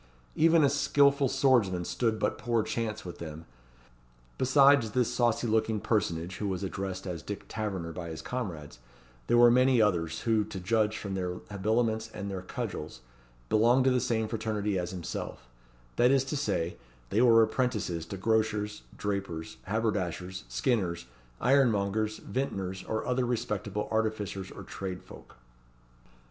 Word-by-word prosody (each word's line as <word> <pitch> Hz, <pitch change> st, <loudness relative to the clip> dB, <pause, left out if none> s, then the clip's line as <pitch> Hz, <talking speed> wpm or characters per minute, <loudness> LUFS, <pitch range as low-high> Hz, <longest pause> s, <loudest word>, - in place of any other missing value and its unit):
Even 165 Hz, 0 st, +5 dB
a -, -, +6 dB
skilful 140 Hz, -1 st, +3 dB
swordsman 100 Hz, -12 st, +2 dB
stood 115 Hz, +1 st, 0 dB
but -, -, -1 dB
poor 115 Hz, -2 st, +1 dB
chance 110 Hz, -2 st, -3 dB
with 90 Hz, -, -8 dB
them. 80 Hz, 0 st, -7 dB, 0.9 s
Besides 135 Hz, -3 st, +5 dB
this 125 Hz, -2 st, +1 dB
saucy 120 Hz, -1 st, +1 dB
looking 110 Hz, -1 st, +1 dB
personage, 90 Hz, -5 st, -1 dB
who 105 Hz, -, -2 dB
was 95 Hz, 0 st, -2 dB
addressed 95 Hz, -1 st, -4 dB
as 90 Hz, -4 st, -4 dB
Dick 105 Hz, +3 st, -6 dB
Taverner 95 Hz, -6 st, -3 dB
by 85 Hz, 0 st, -6 dB
his 80 Hz, -, -7 dB
comrades, 85 Hz, -, -5 dB, 0.5 s
there 120 Hz, -, +4 dB
were 120 Hz, 0 st, +8 dB
many 125 Hz, 0 st, +4 dB
others, 85 Hz, -6 st, +1 dB
who, 110 Hz, -2 st, +2 dB
to 95 Hz, -, -7 dB
judge 110 Hz, +3 st, +1 dB
from 100 Hz, -2 st, -5 dB
their 90 Hz, -1 st, -2 dB, 0.2 s
habiliments 110 Hz, +2 st, 0 dB
and 100 Hz, -1 st, -4 dB
their 95 Hz, -1 st, -4 dB
cudgels, 95 Hz, -, -5 dB, 0.5 s
belonged 120 Hz, -, +4 dB
to 130 Hz, -, +4 dB
the 125 Hz, -, +3 dB
same 110 Hz, -2 st, 0 dB
fraternity 105 Hz, -3 st, -1 dB
as 90 Hz, -1 st, -3 dB
himself; 85 Hz, -8 st, -6 dB, 0.5 s
that 125 Hz, -, +5 dB
is 135 Hz, -1 st, +4 dB
to 135 Hz, +3 st, -4 dB
say, 90 Hz, -, -1 dB, 0.3 s
they 105 Hz, -, +3 dB
were 115 Hz, -2 st, +7 dB
apprentices 110 Hz, -8 st, -1 dB
to 100 Hz, -, -6 dB
grocers, 105 Hz, 0 st, 0 dB, 0.2 s
drapers, 100 Hz, -6 st, -4 dB
haberdashers, 95 Hz, -3 st, -2 dB
skinners, 95 Hz, -, -1 dB, 0.3 s
ironmongers, 110 Hz, -5 st, +2 dB
vintners, 95 Hz, -9 st, -3 dB
or 110 Hz, -, -2 dB
other 125 Hz, 0 st, +1 dB
respectable 105 Hz, -3 st, -2 dB
artificers 110 Hz, -4 st, -1 dB
or -, -, -9 dB
tradesfolk. 95 Hz, -2 st, -8 dB
105 Hz, 145 wpm, -29 LUFS, 95-120 Hz, 0.9 s, were